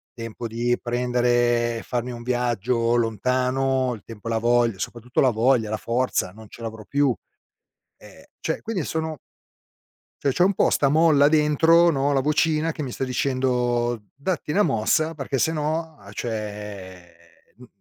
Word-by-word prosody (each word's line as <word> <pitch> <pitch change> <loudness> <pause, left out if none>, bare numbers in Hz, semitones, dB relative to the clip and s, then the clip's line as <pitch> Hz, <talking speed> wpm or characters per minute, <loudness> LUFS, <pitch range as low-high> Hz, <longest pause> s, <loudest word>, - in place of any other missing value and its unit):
Tempo 115 0 -6
di 120 +2 0
prendere 120 -1 +1
e - - -7
farmi 125 0 -3
un 120 -1 -7
viaggio 120 -1 0
lontano, 125 +3 +1
il 105 - -13
tempo 115 0 -10
e - - -1
la 115 - +1
voglia- 120 -3 +2
soprattutto 120 +5 -2
la 130 - +5
voglia, 115 0 +2
la 110 - -1
forza- 120 -5 -1
non 110 0 -12
ce - - -13
l'avrò 110 -1 -6
più. 140 -3 +2 0.8
Ehm, - - -16 0.2
cioè, - - -2
quindi, 195 -9 -3
sono 160 -1 -3 1.0
cioè, 140 - +2
c'ho 175 +7 +3
un 195 - +2
po' - - +3
'sta 140 - +3
molla 150 -1 +5
dentro, 160 +3 +4
no, 140 0 +1
la 135 -1 +2
vocina 155 +2 +1
che 155 - -7
mi 130 -4 -4
sta - - -4
dicendo: 125 -3 0
“Datti 150 +1 -3
'na 205 +6 +3
mossa”, 155 +5 +1
perché 135 -2 -3
se 160 - +2
no, 160 +1 -2
a 100 0 -13
cioè, 105 -5 -6 0.4
mhmm 125 0 -14
125 Hz, 165 wpm, -24 LUFS, 115-145 Hz, 1.0 s, la